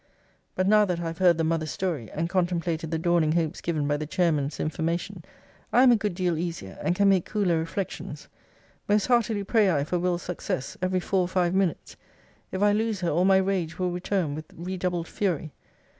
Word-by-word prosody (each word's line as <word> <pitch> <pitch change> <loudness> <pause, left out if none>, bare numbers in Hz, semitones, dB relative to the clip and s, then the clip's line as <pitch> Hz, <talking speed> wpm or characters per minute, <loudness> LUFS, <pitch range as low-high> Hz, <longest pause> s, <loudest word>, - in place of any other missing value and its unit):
But 185 - +1
now 210 +1 +6
that 180 -3 -2
I - - -4
have 165 +1 -5
heard 175 -3 +5
the 165 - 0
mother's 160 -1 0
story, 160 - -3
and 165 +2 -2
contemplated 170 -3 -1
the 165 - -1
dawning 165 -2 +2
hopes 165 0 -1
given 155 -4 -1
by 145 0 +1
the 155 0 -5
chairman's 160 -5 0
information, 170 +4 -2 0.5
I 250 - +5
am 255 - +7
a - - +6
good 210 -4 -2
deal 175 -3 0
easier, 165 - -5
and 175 - 0
can 200 +1 +3
make 190 -3 +4
cooler 190 -6 +1
reflections. 165 +4 -5 0.6
Most 205 0 +3
heartily 230 -4 +2
pray 210 0 +3
I 145 -5 +1
for 175 +4 -1
Will.'s 175 0 -1
success, 165 -6 -4
every 185 0 0
four 190 +1 +1
or 180 - 0
five 180 -1 +1
minutes. 190 -3 -1 0.5
If 190 +2 -1
I 205 - +5
lose 215 -1 0
her, 175 - 0
all 175 +4 +2
my 190 0 +5
rage 190 -4 -1
will 180 -1 -1
return 175 -3 -1
with 155 +1 -6
redoubled 180 -1 -3
fury. 165 -7 -2
175 Hz, 205 wpm, -26 LUFS, 165-190 Hz, 0.6 s, am